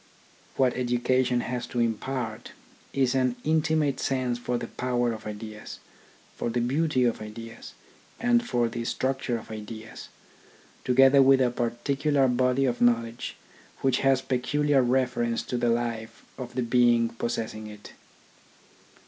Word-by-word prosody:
What 130 Hz, -2 st, +3 dB
education, 125 Hz, 0 st, +1 dB
has 125 Hz, -1 st, -4 dB
to 125 Hz, -, -3 dB
impart 115 Hz, 0 st, -2 dB, 0.4 s
is 135 Hz, -2 st, +1 dB
an 130 Hz, -2 st, +1 dB
intimate 155 Hz, -2 st, +1 dB
sense 130 Hz, -2 st, -1 dB
for 120 Hz, 0 st, -2 dB
the 120 Hz, -, -4 dB
power 120 Hz, -1 st, -1 dB
of 110 Hz, -1 st, -8 dB
ideas, 105 Hz, 0 st, -8 dB, 0.6 s
for -, -, -2 dB
the 120 Hz, -, -1 dB
beauty 130 Hz, +2 st, +1 dB
of 120 Hz, -3 st, 0 dB
ideas, 115 Hz, +1 st, -9 dB, 0.5 s
and 240 Hz, 0 st, +3 dB
for 120 Hz, -, 0 dB
the 115 Hz, +1 st, -4 dB
structure 130 Hz, 0 st, -1 dB
of 110 Hz, -, -11 dB
ideas, 110 Hz, +1 st, -8 dB, 0.7 s
together 135 Hz, +2 st, +6 dB
with 135 Hz, 0 st, +6 dB
a 125 Hz, -2 st, +2 dB
particular 135 Hz, +4 st, 0 dB
body 125 Hz, +2 st, +2 dB
of 120 Hz, -2 st, -1 dB
knowledge 115 Hz, -1 st, +1 dB, 0.5 s
which 135 Hz, -2 st, +2 dB
has 135 Hz, -1 st, +2 dB
peculiar 140 Hz, +2 st, +1 dB
reference 125 Hz, -2 st, 0 dB
to -, -, -4 dB
the 120 Hz, -1 st, +1 dB
life 115 Hz, -1 st, -2 dB
of 120 Hz, -2 st, -8 dB
the 130 Hz, -, 0 dB
being 120 Hz, -1 st, +3 dB
possess 115 Hz, -1 st, -3 dB
ing 110 Hz, 0 st, -8 dB
it. 105 Hz, -1 st, -12 dB
125 Hz, 140 wpm, -27 LUFS, 115-130 Hz, 0.7 s, together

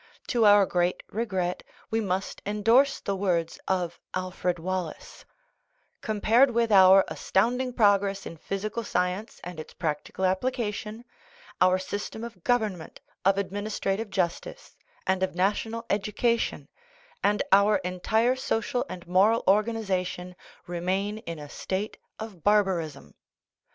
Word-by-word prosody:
To 235 Hz, -2 st, +3 dB
our 205 Hz, -1 st, +7 dB
great 175 Hz, 0 st, 0 dB
regret 190 Hz, -5 st, -2 dB, 0.3 s
we 225 Hz, 0 st, +1 dB
must 190 Hz, -1 st, -3 dB
en 210 Hz, 0 st, -3 dB
dorse 265 Hz, +5 st, +4 dB
the 200 Hz, -, -2 dB
words 175 Hz, -4 st, -1 dB
of 180 Hz, -3 st, -1 dB, 0.2 s
Alfred 185 Hz, -1 st, -2 dB
Wallace: 180 Hz, -1 st, -5 dB, 0.8 s
"Compared 225 Hz, +4 st, +3 dB
with 235 Hz, -1 st, +1 dB
our 190 Hz, -1 st, +7 dB
astounding 250 Hz, +6 st, 0 dB
progress 200 Hz, -4 st, +2 dB
in 165 Hz, -, -8 dB
physical 210 Hz, +7 st, -4 dB
science 180 Hz, +2 st, -2 dB
and 180 Hz, -2 st, -7 dB
its 155 Hz, -, -9 dB
practical 160 Hz, +3 st, -2 dB
application, 215 Hz, +2 st, -2 dB, 0.6 s
our 185 Hz, 0 st, +5 dB
system 205 Hz, +4 st, -5 dB
of 225 Hz, -7 st, -9 dB
government, 215 Hz, -9 st, -1 dB, 0.3 s
of 195 Hz, 0 st, +4 dB
ad 200 Hz, -2 st, -1 dB
ministrative 205 Hz, +1 st, -2 dB
justice, 185 Hz, -, -3 dB, 0.3 s
and 190 Hz, 0 st, +1 dB
of 190 Hz, -2 st, -1 dB
national 220 Hz, +5 st, 0 dB
education, 210 Hz, +3 st, 0 dB, 0.6 s
and 205 Hz, +1 st, +2 dB
our 200 Hz, +2 st, +6 dB
entire 220 Hz, +7 st, +1 dB
social 245 Hz, -1 st, -1 dB
and 180 Hz, -1 st, -8 dB
moral 195 Hz, +6 st, +3 dB
organization, 190 Hz, -4 st, 0 dB, 0.3 s
remain 190 Hz, +4 st, -2 dB
in 170 Hz, -6 st, -7 dB
a 150 Hz, -1 st, -8 dB
state 190 Hz, +7 st, -4 dB, 0.2 s
of 215 Hz, -7 st, -9 dB
barbarism." 175 Hz, -, +1 dB
195 Hz, 125 wpm, -27 LUFS, 180-220 Hz, 0.8 s, our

